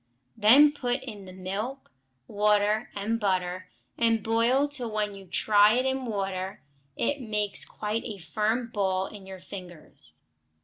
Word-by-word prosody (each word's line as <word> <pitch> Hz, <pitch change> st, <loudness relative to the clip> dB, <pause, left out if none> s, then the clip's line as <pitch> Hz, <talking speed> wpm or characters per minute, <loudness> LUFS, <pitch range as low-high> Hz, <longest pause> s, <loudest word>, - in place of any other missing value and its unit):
Then 255 Hz, +8 st, +7 dB
put 260 Hz, -2 st, -2 dB
in 210 Hz, -6 st, -8 dB
the 185 Hz, -, -10 dB
milk, 195 Hz, -, -5 dB, 0.4 s
water, 210 Hz, +1 st, +2 dB
and 215 Hz, +3 st, -1 dB
butter, 185 Hz, -2 st, -1 dB, 0.3 s
and 230 Hz, -2 st, +3 dB
boil 235 Hz, +5 st, +3 dB
till 265 Hz, -5 st, -4 dB
when 210 Hz, -1 st, -1 dB
you 195 Hz, -1 st, -11 dB
try 205 Hz, +3 st, +5 dB
in 265 Hz, 0 st, 0 dB
water 195 Hz, -3 st, -3 dB, 0.3 s
it 285 Hz, -1 st, -1 dB
makes 210 Hz, -3 st, -1 dB
quite 215 Hz, +2 st, -3 dB
a 215 Hz, -4 st, -5 dB
firm 215 Hz, +8 st, -1 dB
ball 190 Hz, -2 st, +1 dB
in 195 Hz, -1 st, -10 dB
your 190 Hz, 0 st, -8 dB
fingers. 175 Hz, -, -7 dB
210 Hz, 140 wpm, -27 LUFS, 190-230 Hz, 0.4 s, Then